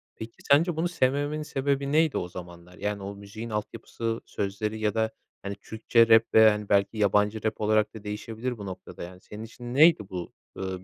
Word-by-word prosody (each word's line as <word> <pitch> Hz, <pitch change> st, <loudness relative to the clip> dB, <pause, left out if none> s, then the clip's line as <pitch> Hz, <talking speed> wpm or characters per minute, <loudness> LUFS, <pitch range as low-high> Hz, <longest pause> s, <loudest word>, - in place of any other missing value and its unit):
Peki, 110 Hz, +1 st, -8 dB, 0.2 s
sence 165 Hz, +3 st, +5 dB
bunu 165 Hz, +2 st, 0 dB
sevmemenin 145 Hz, -1 st, 0 dB
sebebi 140 Hz, -1 st, -1 dB
neydi 160 Hz, 0 st, +3 dB
o 90 Hz, -, -2 dB
zamanlar? 90 Hz, 0 st, -11 dB
Yani, 105 Hz, -1 st, -3 dB
o 100 Hz, +1 st, -6 dB
müziğin 100 Hz, +3 st, -8 dB
altyapısı, 115 Hz, +1 st, -4 dB
sözleri 105 Hz, +2 st, -3 dB
ya 105 Hz, -2 st, 0 dB
da, 110 Hz, 0 st, 0 dB, 0.3 s
hani, 100 Hz, 0 st, -5 dB
Türkçe 115 Hz, +2 st, +2 dB
rap 115 Hz, 0 st, +7 dB
veya, 110 Hz, -1 st, +8 dB
hani, 105 Hz, -1 st, -6 dB
belki 100 Hz, +2 st, +2 dB
yabancı 105 Hz, +1 st, +2 dB
rap 110 Hz, 0 st, -2 dB
olarak 110 Hz, 0 st, +2 dB
da 110 Hz, -1 st, -10 dB
değişebilir 110 Hz, +4 st, -4 dB
bu 100 Hz, -, -7 dB
noktada, 95 Hz, -2 st, -8 dB
yani, 90 Hz, +1 st, -10 dB
senin 105 Hz, +1 st, -9 dB
için 120 Hz, +2 st, -8 dB
neydi 145 Hz, -, +5 dB
bu, 90 Hz, -2 st, -6 dB, 0.2 s
ııı, 95 Hz, -1 st, -4 dB
110 Hz, 190 wpm, -27 LUFS, 100-120 Hz, 0.3 s, veya